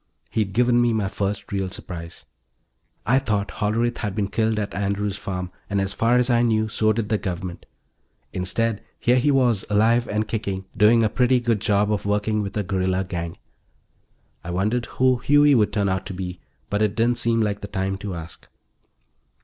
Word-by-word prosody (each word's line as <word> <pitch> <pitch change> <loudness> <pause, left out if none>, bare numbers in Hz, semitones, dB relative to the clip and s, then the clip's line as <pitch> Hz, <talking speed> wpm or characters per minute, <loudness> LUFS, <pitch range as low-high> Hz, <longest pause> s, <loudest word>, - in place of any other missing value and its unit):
He'd 105 -3 -1
given 120 +1 +3
me 120 -1 +2
my 105 -3 0
first 100 +2 -3
real 95 -2 -1
surprise; 85 -2 -8 0.8
I'd 130 +4 +2
thought 105 -2 0
Hollerith 115 +3 -1
had 105 -4 -3
been 100 -2 -1
killed 110 0 0
at 105 -2 -2
Andrew's 100 0 -1
Farm, 90 -3 -5 0.2
and, 100 -1 0
as 95 0 -1
far 115 +3 +2
as 125 -1 +3
I 120 -2 +3
knew, 110 -2 +2
so 110 0 +2
did 110 -1 -2
the 110 - +1
Government. 90 -2 -5 0.7
Instead, 105 +4 -1 0.2
here 125 +1 +3
he 145 +4 +2
was, 125 -7 +3
alive 115 +3 +3
and 105 +1 -1
kicking, 100 -4 -3
doing 115 +1 +5
a - - +4
pretty 125 +2 +3
good 115 -4 0
job 105 0 +2
of 100 - -2
working 105 +1 +1
with 100 0 -4
a 105 - 0
guerrilla 95 0 0
gang. 85 -3 -5 1.1
I 85 - -7
wondered 105 +7 0
who 130 -1 +2
Huey 145 +1 +5
would 110 -5 +3
turn 100 -2 0
out 95 0 -1
to 95 - -6
be, 90 -1 -5 0.3
but 105 +1 0
it 105 -1 +1
didn't 120 +2 +1
seem 115 -1 +1
like 105 -2 -1
the 100 - -5
time 95 0 -2
to 100 -2 -5
ask. 85 -1 -10
105 Hz, 190 wpm, -23 LUFS, 95-115 Hz, 1.1 s, doing